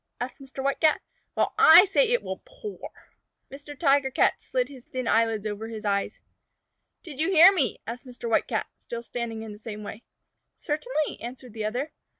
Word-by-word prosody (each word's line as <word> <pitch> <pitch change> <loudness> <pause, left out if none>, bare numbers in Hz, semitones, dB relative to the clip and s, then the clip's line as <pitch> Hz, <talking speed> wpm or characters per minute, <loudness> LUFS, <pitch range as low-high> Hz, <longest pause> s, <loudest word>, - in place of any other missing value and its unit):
asked 250 +3 -6
Mr. 270 0 -8
White 275 0 0
Cat. 315 -1 +4 0.4
"Well, - - +1
I 335 +5 +9
say 470 +5 +2
it 485 +1 +1
will - - -6
pour." - - -9 0.6
Mr. 290 +1 -10
Tiger 280 -3 +3
Cat 260 - +1
slid 250 -1 -1
his 260 -3 -13
thin 255 -2 -5
eyelids 225 -2 +2
over 215 +1 -4
his 220 -1 -8
eyes. 200 -1 -1 0.8
"Did 295 -5 -10
you 320 - +1
hear 365 +1 +8
me?" 280 - 0
asked 240 +3 -7
Mr. 245 -1 -7
White 230 - +1
Cat, - - -1
still 235 0 -7
standing 230 -2 -5
in 220 - -8
the 210 - -11
same 210 -1 -7
way. 210 +2 -8 0.6
"Certainly," 310 +2 -2
answered 245 0 -9
the 220 -1 -4
other. 250 +8 -3
255 Hz, 185 wpm, -26 LUFS, 225-305 Hz, 0.8 s, I